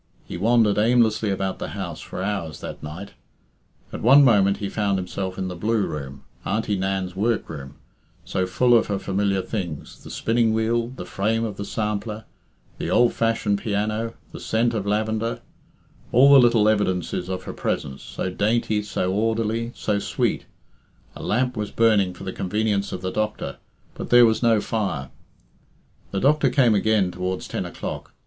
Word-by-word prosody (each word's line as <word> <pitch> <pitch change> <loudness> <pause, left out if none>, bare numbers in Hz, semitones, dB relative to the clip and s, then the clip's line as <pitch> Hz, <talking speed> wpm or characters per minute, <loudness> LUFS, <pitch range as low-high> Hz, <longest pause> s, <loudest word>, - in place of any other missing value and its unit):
He - - -7
wandered 110 +2 +3
aimlessly 110 -1 +3
about 95 -1 -2
the - - -4
house 85 -5 -5
for 95 - -6
hours 95 -7 -3
that - - -7
night. 85 +7 -8 0.8
At - - -5
one 135 +5 +7
moment 100 -5 +4
he 100 - -3
found 100 -1 0
himself 95 0 -4
in 95 - -2
the 90 - -5
blue 105 +3 0
room, 70 -2 -6 0.2
Auntie 105 0 -1
Nan's 95 -1 -2
workroom, 80 -10 -2 0.5
so 95 0 -1
full 120 +6 +3
of 115 - +3
her 100 - -1
familiar 100 0 0
things 90 -9 -6
the - - -10
spinning 115 -1 +1
wheel, 115 +1 +1
the 125 -7 -8
frame 110 +5 0
of 105 -3 -5
the 100 - -4
sampler, 105 +1 -3 0.5
the - - -3
old 120 -1 +4
fashioned 115 -3 0
piano, 110 +2 -2 0.2
the - - -8
scent 115 +2 0
of 105 -3 -2
lavender 110 +2 -1 0.7
all 135 +4 +7
the 140 - +10
little 115 -4 +4
evidences 95 -4 0
of 95 -1 -3
her - - -6
presence, 65 0 -3
so 95 - -4
dainty, 110 +2 +1
so 95 -3 -2
orderly, 115 +2 0
so 105 -1 -1
sweet - - -1 0.7
A - - -8
lamp 125 +2 0
was 105 -1 -3
burning 105 -5 +2
for - - -10
the 95 - -5
convenience 100 +1 -1
of 90 - -5
the 95 - -2
doctor, 110 +1 -3 0.4
but - - -7
there 120 0 +8
was 110 -1 +2
no 115 -3 +3
fire. 100 - -2 1.0
The 100 - -2
doctor 150 +7 +3
came 125 -6 +4
again 105 -2 +2
towards 90 +1 -3
ten - - -3
o'clock. - - -7
105 Hz, 170 wpm, -23 LUFS, 95-115 Hz, 1.0 s, the